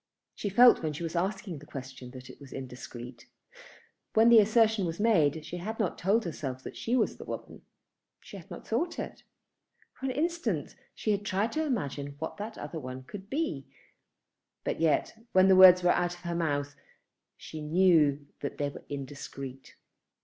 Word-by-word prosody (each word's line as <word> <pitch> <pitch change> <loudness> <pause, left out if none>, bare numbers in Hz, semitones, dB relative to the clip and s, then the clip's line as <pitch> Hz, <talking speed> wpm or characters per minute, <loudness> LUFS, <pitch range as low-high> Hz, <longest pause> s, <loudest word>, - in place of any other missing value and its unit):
She 205 - -3
felt 240 +5 +7
when 155 -2 -2
she 155 - -6
was 165 +1 -4
asking 190 -2 -2
the 150 - -15
question 130 -3 -8
that 130 0 -11
it - - -13
was 140 - -12
indiscreet. 125 -2 -8 0.9
When 225 +2 +6
the 235 -1 +9
assertion 220 -2 +3
was 165 +2 -5
made 160 -9 +3
she 175 - -6
had 215 +6 -5
not 205 -5 0
told 205 +5 +2
herself 135 -6 -5
that - - -8
she 235 - -1
was 235 - +1
the - - -8
woman. - - -7 0.6
She - - -12
had - - -13
not - - -9
thought 345 0 -1
it. - - -6 0.7
For 270 - -5
an - - 0
instant 275 - -1 0.2
she 215 - -1
had 205 0 0
tried 205 +2 0
to 315 - 0
imagine 145 - -3
who 160 - -2
that 215 +2 -6
other 165 - -6
one 130 -1 -7
could 195 +8 -10
be. 270 - -2 1.0
But - - -2
yet, 160 -2 +2 0.2
when 185 0 +6
the 190 - +7
words 185 -1 +9
were 175 - +5
out 175 0 0
of 175 - -16
her 170 -1 -3
mouth, 145 -4 -1 0.6
she 155 - -8
knew 150 -3 +3
that 140 - -5
they 145 -1 -1
were - - -11
indiscreet. 135 -1 -7
170 Hz, 185 wpm, -29 LUFS, 140-210 Hz, 1.0 s, the